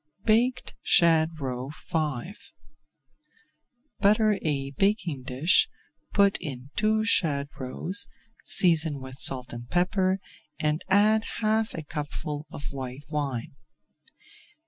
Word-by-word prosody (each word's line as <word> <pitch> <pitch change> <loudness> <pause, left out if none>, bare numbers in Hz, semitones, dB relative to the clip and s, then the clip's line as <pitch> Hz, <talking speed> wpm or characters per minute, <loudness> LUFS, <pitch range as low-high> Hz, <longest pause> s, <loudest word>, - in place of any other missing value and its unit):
BAKED 245 +3 +2
SHAD 165 -1 +3
ROE 130 -1 -4 0.2
V 155 0 -1 1.7
Butter 210 0 +3
a 140 -3 -1
baking 175 - 0
dish, 135 +7 +2 0.4
put 200 -1 +3
in 135 -4 -7
two 215 0 +2
shad 145 -10 +2
roes, 160 +9 -2 0.4
season 160 -5 +3
with 130 0 -9
salt 125 -3 +1
and 120 0 -8
pepper, 185 +1 +1 0.4
and 150 +1 0
add 215 +3 +4 0.2
half 220 +1 +1
a 160 - -5
cupful 150 0 -5
of 145 - -8
white 135 +1 -7
wine. 140 -6 -3
155 Hz, 105 wpm, -27 LUFS, 135-200 Hz, 1.7 s, add